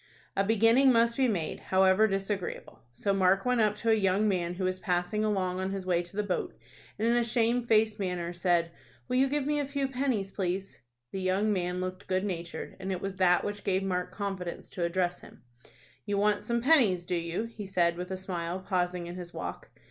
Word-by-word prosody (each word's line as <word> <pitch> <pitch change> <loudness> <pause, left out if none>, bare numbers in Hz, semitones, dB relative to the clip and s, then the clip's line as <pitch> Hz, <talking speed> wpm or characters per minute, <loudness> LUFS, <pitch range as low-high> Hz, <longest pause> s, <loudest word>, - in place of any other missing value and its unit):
A 195 - +2
beginning 225 +5 +5
must 235 0 +3
be 265 0 +3
made, 175 -9 -2
however 190 +3 +4
disagreeable. 195 -1 -4
So 200 +11 -1
Mark 195 +1 +3
went 250 -2 +2
up 210 -1 +2
to 225 +2 0
a - - +6
young 200 0 +2
man 180 -3 0
who 185 - -4
was 185 0 -1
passing 180 +3 0
along 185 -4 0
on 190 0 -1
his 195 -1 -4
way 175 -2 +2
to 175 +2 -13
the 210 - 0
boat, 190 -3 -2 0.4
and 220 +2 0
in 235 - +3
a 240 - +3
shamefaced 230 -2 +2
manner 180 -3 -2
said, 175 -1 +1 0.4
"Will 250 - 0
you 265 +1 +4
give 290 0 0
me 295 0 +1
a 290 - 0
few 280 -1 -1
pennies, 250 -7 -1
please?" 190 0 -3 0.3
The 195 - -4
young 195 +3 +1
man 180 -1 -1
looked 185 +1 -5
good 185 +1 0
natured, 170 -3 -5
and 190 0 -4
it 185 - -2
was 195 0 -5
that 180 -1 +4
which 205 0 -4
gave 190 -1 +1
Mark 180 -1 -2
confidence 190 -3 -5
to 175 - -3
address 175 0 0
him. - - -16 0.6
"You 205 -1 -1
want 210 +1 +2
some 235 0 -1
pennies, 235 - +4
do 180 - -3
you?" 170 +3 -1
he 225 -3 -7
said, 175 -3 +2
with 180 +1 -5
a 190 - -3
smile, 180 -1 -4
pausing 180 -2 0
in 175 +1 -7
his 175 -1 -8
walk. - - -6
195 Hz, 215 wpm, -29 LUFS, 180-215 Hz, 0.6 s, a